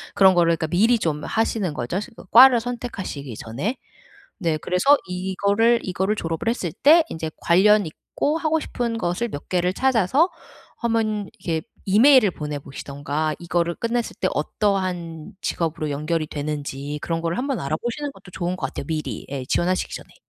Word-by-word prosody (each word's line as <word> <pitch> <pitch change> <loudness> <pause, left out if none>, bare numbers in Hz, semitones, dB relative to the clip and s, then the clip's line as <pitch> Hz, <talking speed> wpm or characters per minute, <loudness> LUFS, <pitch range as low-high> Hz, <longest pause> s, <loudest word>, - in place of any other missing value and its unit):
그런 190 -1 +6
거를 170 -1 +4
그니까 160 - -2
미리 220 +9 +3
좀 150 -4 -1
하시는 220 -5 0
거죠, 130 +8 -2
지금 210 0 -10
과를 250 +1 +9
선택하시기 225 - -5
전에. 140 - -3 0.6
네. 165 -5 0
그래서 180 - +3
이거를 200 +6 +1
이거를 190 +3 -1
졸업을 165 +3 -3
했을 190 -8 -2
때 315 - +6
이제 160 -1 -4
관련 205 +4 +5
있고 290 - -2
하고 320 0 +1
싶은 235 -4 -3
것을 180 +7 -1
몇 145 - -8
개를 180 0 +1
찾아서 265 - +3 0.5
1 235 -1 -1
번 215 -3 0
이렇게 160 -2 -2 0.2
이메일을 220 +2 +6
보내 150 -3 -5
보시든가 145 +2 -4
이거를 170 0 -1
끝냈을 235 0 -2
때 185 - +1
어떠한 180 -1 -2
직업으로 160 -2 -2
연결이 155 +2 -1
되는지 145 -1 -4
그런 165 -1 -2
거를 170 0 -1
한번 270 -1 -1
알아보시는 235 - -3
것도 180 - -15
좋은 175 +1 -2
것 135 - -2
같아요. 135 - -7
미리 155 -2 -4
네 135 -2 -4
지원하시기 180 +5 0
전에. - - -11
180 Hz, 365 characters per minute, -23 LUFS, 155-225 Hz, 0.6 s, 과를